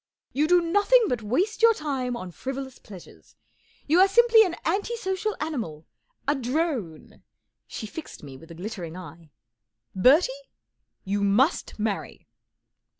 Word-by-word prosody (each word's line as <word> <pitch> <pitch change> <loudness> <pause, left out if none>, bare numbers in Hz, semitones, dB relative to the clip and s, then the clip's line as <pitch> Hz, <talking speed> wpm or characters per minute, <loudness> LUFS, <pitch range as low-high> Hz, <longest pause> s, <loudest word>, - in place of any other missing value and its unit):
You 295 +3 +1
do 355 +1 +5
nothing 410 +8 +4
but 245 -2 -1
waste 345 - -1
your 460 -1 +6
time 265 -6 -3
on 185 -6 -7
frivolous 265 +5 -6
pleasures. 190 -4 -14 0.5
You 320 +4 +3
are 380 - +7
simply 455 +2 +6
an 355 -5 -2
anti 415 +4 -1
social 410 -1 -2
animal, 230 - -4 0.4
a 290 - +3
drone 255 - -3 0.2
" - - -56
She - - -6
fixed 305 - -9
me 135 -2 -10
with 165 +5 -14
a 165 - -10
glittering 180 -2 -7
eye. 165 -2 -11 0.6
44 190 - -5
Bertie, 305 - +5 0.7
you 200 +1 -1
must 235 - +1
marry 210 -2 -4
265 Hz, 150 wpm, -25 LUFS, -, 0.7 s, are